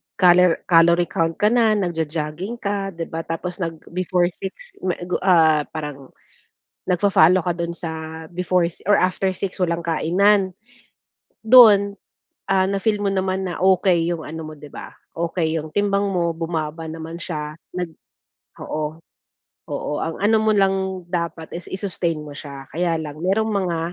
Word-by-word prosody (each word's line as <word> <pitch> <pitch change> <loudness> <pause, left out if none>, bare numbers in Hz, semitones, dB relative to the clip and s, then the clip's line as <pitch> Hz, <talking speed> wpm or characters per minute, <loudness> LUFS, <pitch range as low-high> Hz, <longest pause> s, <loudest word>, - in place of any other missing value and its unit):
calor 180 -1 +5
calorie 170 0 +5
count 165 0 0
ka 210 - +3
na. 230 -2 +4
Nagjo-jogging 165 +2 -3
ka, 200 -2 -2
'di 165 0 -5
ba? 165 0 -4
Tapos, 175 +2 -4
nag-before 175 +2 -1
6:00 195 - -9
ma 180 - +1
gu 175 +1 -2
ah, 160 -5 +5
parang 150 -4 -7 0.8
nagfa-follow 180 -1 +4
ka 175 - +1
do'n 170 0 -3
sa 160 -1 -6
before 180 0 +1 0.2
or 205 - +6
after 185 +1 +1
6:00 190 0 -5
walang 170 -1 0
kainan. 190 +4 +2 0.9
Dun, 215 -4 +7 0.5
ah, 190 -1 +3
na-feel 205 +2 0
mo 200 - +1
naman 190 0 -1
na 175 - -4
okey 180 -3 +3
yung 165 -3 -4
ano 160 +1 -6
mo, 155 - -8
'di 150 0 -11
ba, - - -9 0.2
okey 165 -1 -1
yung 155 0 -7
timbang 200 0 +1
mo. 170 -3 0
Bumaba 160 -1 -4
naman 165 +1 -7
siya. 150 -4 -4 0.2
Nag 180 -2 -3 0.7
oo, 155 0 -3 0.7
oo, - - -3
ang 165 - -3
ano 215 +3 +4
mo 215 0 +3
lang 190 -2 0
dapat 170 -2 -4
is 175 - -8
i-sustain 180 -5 -2
mo 145 -1 -9
siya. 140 -3 -9
Kaya 170 0 0
lang, 150 -1 -7
merong 195 +5 +1
mga, 185 -5 -1
175 Hz, 155 wpm, -22 LUFS, 160-190 Hz, 0.9 s, Dun